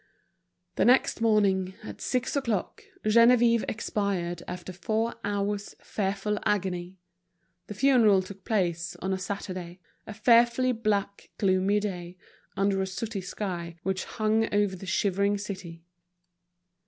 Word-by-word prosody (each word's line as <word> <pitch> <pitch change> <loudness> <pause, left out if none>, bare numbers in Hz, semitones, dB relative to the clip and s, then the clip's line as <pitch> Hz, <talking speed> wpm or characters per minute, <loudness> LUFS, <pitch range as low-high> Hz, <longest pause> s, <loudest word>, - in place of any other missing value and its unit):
The - - +3
next 250 -1 +4
morning, 195 -4 +2
at 105 -1 -9
six 255 +2 -1
o'clock, 255 - -2 0.2
Geneviève 235 +1 +5
expired 195 -5 -2
after 180 +1 -6
four 220 +6 -1
hours' 205 0 -2
fearful 200 +1 -2
agony. 185 -2 -1 0.7
The 210 - -7
funeral 220 -6 +4
took 190 0 -11
place 175 -5 -1
on 190 0 -3
a 190 - -2
Saturday, 185 -2 -5 0.3
a 215 - -6
fearfully 235 +3 +4
black, 210 -4 -1
gloomy 195 +1 +2
day, 180 -3 -5 0.4
under 195 0 +2
a 190 - -1
sooty 205 +2 -4
sky 175 -3 -5
which 190 -1 -1
hung 220 +1 0
over 205 -2 +1
the 190 +1 -10
shivering 200 +2 +1
city. 190 -5 -7
200 Hz, 125 wpm, -27 LUFS, 185-215 Hz, 0.7 s, Geneviève